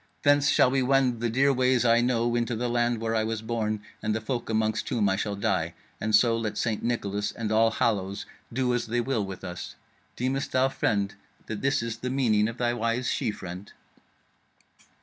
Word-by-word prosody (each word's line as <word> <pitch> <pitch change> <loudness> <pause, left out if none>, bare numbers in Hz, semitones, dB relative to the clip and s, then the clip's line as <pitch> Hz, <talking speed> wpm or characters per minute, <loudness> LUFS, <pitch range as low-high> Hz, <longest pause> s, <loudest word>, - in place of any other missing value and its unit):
Thence 145 -1 +4
shall 130 -2 +4
we 135 0 +2
wend 130 -2 +2
the 120 0 0
dear 135 +4 +3
ways 125 -1 +2
I 115 0 +5
know 120 -1 +1
into 120 0 0
the 120 +2 -1
land 120 -1 +1
where 115 0 -1
I 110 -1 +2
was 110 0 -3
born 110 -2 -2 0.2
and 105 0 0
the - - 0
folk 120 +1 -4
amongst 110 -1 0
whom 110 -4 +1
I 95 - +2
shall 105 0 -2
die. 95 -5 -1 0.2
And 110 0 +2
so 115 +2 +4
let 115 -2 -3
St. 110 -3 -1
Nicholas 105 -4 -1
and 110 -2 -4
All 110 +1 +4
Hallows 100 -4 -1 0.3
do 125 0 0
as 120 - -1
they 120 +2 0
will 120 -3 0
with 95 -1 -7
us. 90 -1 -6 0.4
Deemest 130 +2 -2
thou, 130 +1 +3
friend, 100 -6 0 0.3
that 105 -2 -5
this 140 -3 +1
is 115 -1 -4
the 125 +2 -4
meaning 115 -6 +2
of 115 +1 -6
thy 120 -1 +1
wise 120 +2 -1
she 125 - 0
friend?" 95 -2 -7
115 Hz, 205 wpm, -27 LUFS, 110-125 Hz, 0.4 s, I